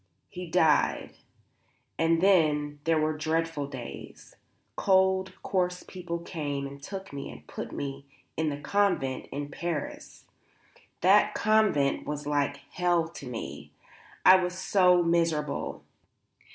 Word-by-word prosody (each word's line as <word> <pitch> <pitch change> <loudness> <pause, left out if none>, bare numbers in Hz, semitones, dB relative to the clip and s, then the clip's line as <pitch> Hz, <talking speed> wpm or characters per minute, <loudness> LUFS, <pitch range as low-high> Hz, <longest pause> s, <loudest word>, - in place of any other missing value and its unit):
He 180 0 -7
died. 160 -4 +2 0.9
And 165 0 +3
then 150 -6 +3
there 165 -1 +3
were 155 0 0
dreadful 160 -1 -1
days. 120 - -9 0.4
Cold, 190 -1 +2
coarse 180 -1 -1
people 175 -2 -5
came 145 -5 -4
and 140 0 -9
took 195 +3 -7
me 140 - -6
and 75 +1 -12
put - - -7
me 140 0 -5 0.3
in 160 -1 0
a 145 - -5
convent 145 -5 0
in 145 +1 -4
Paris. 170 -1 -5 0.8
That 205 +3 +5
convent 215 -11 +2
was 150 -1 -4
like 145 -1 0
hell 175 -2 +1
to 145 -5 -10
me. 120 -2 -7 0.5
I 185 +1 +9
was 180 0 -2
so 180 -2 +4
miserable. 165 -4 0
165 Hz, 125 wpm, -28 LUFS, 145-180 Hz, 0.9 s, I